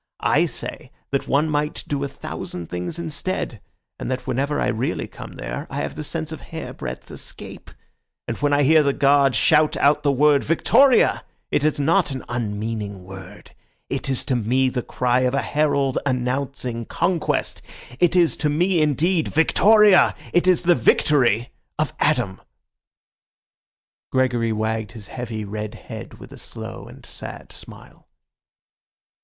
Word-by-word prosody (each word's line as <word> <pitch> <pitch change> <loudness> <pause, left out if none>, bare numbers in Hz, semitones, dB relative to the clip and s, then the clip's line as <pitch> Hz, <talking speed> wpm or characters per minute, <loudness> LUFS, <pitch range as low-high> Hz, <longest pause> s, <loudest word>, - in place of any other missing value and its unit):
I - - +4
say - - -6 0.2
that 140 - -1
one 145 +3 +2
might 150 0 -1
do 140 -1 -2
a - - -1
thousand 90 -10 -7
things 90 - -4
instead, 160 - -3 0.4
and - - -4
that 130 0 -3
whenever 140 +4 -1
I - - +1
really 115 +4 -1
come - - -10
there 60 -2 -6
I - - -7
have - - -4
the 155 - -6
sense 160 +1 -4
of 160 - -7
hairbreadth 155 - -7
escape. - - -9 0.6
And 115 - -2
when 145 0 +1
I 145 0 +3
hear 155 +3 +6
the 140 -2 +1
guard 140 -2 +4
shout 150 +7 +3
out 150 +1 +3
the 145 - +2
word 145 +1 +4
'Victoria,' 250 - +4 0.3
it 145 - +1
is 155 -1 +1
not 165 +6 +2
an 135 -2 -6
unmeaning 105 -3 -4
word. 95 +1 -11 0.4
It - - -2
is 130 - -2
to 130 - 0
me 125 +3 +2
the 125 -1 -2
cry 125 +1 0
of 130 +1 +1
a 140 - 0
herald 140 -3 +1
announcing 125 -2 -2
conquest. 170 +4 -1 0.4
It 175 +1 +3
is 175 -3 +4
to 150 - 0
me 170 +3 +2
indeed 155 +3 +1
'Victoria'; 205 +5 +5 0.2
it 175 +1 +3
is 180 -2 +4
the 175 0 +5
victory 125 -3 +2 0.3
of - - -1
Adam." 95 0 +1 1.7
Gregory 125 -3 +1
wagged 110 0 -2
his 110 -4 -10
heavy, 115 -4 -5
red 105 +1 -5
head - - -9
with - - -13
a - - -11
slow - - -8
and - - -14
sad - - -9
smile. - - -15
140 Hz, 155 wpm, -22 LUFS, 115-155 Hz, 1.7 s, hear